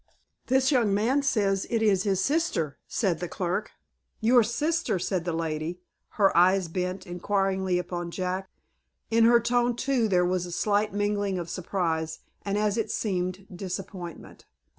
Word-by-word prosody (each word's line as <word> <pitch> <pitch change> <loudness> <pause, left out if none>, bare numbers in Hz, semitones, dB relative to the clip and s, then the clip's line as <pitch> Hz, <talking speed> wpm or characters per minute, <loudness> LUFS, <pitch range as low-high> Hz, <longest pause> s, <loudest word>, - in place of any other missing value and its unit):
"This 265 +2 +3
young 230 -7 +3
man 245 +7 +2
says 200 -8 +1
it 230 -2 +1
is 200 -4 +3
his 195 -2 +1
sister," 195 - 0
said 180 -7 0
the 175 - -3
clerk. 185 +4 -2 0.5
"Your 240 +2 +5
sister!" 255 - 0
said 180 -1 -2
the 175 - -1
lady, 165 +1 -3 0.4
her 200 -3 +4
eyes 185 +1 +4
bent, 180 +2 -3
inquiringly, 190 0 0
upon 175 -1 -4
Jack. 185 +2 -3 0.6
In 225 0 +5
her 235 +1 +6
tone, 240 +1 +1
too, 245 -2 +1
there 180 -3 +3
was 180 0 0
a - - -8
slight 210 +3 +1
mingling 205 -1 0
of 170 -1 -5
surprise, 165 -4 -2 0.2
and, 200 0 -2
as 210 0 +1
it 225 - -1
seemed, 185 -2 -2
disappointment. 185 -2 -7
195 Hz, 155 wpm, -27 LUFS, 180-220 Hz, 0.6 s, her